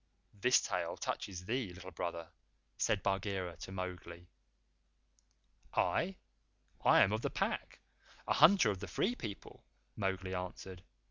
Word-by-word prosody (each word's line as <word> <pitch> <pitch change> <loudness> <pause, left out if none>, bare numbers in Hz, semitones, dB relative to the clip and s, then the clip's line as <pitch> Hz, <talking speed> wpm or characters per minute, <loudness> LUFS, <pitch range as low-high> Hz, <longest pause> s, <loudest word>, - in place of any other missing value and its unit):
"This 110 +5 +4
tale - - -2
touches 90 -2 -4
thee, 115 -2 -1
Little 95 +1 -9
Brother," 85 -1 -4 0.5
said 100 -4 +1
Bagheera 95 -3 -1
to - - -8
Mowgli. 90 -2 -6 1.5
"I? 185 +3 +2 0.7
I - - +7
am 100 - +5
of 110 +1 0
the - - 0
Pack - - -2 0.5
a - - +3
hunter 175 - +7
of 95 - -4
the 100 - -6
Free 190 - +1
People," 110 - -8 0.3
Mowgli 95 -2 -2
answered. 90 0 -5
95 Hz, 130 wpm, -35 LUFS, 90-105 Hz, 1.5 s, I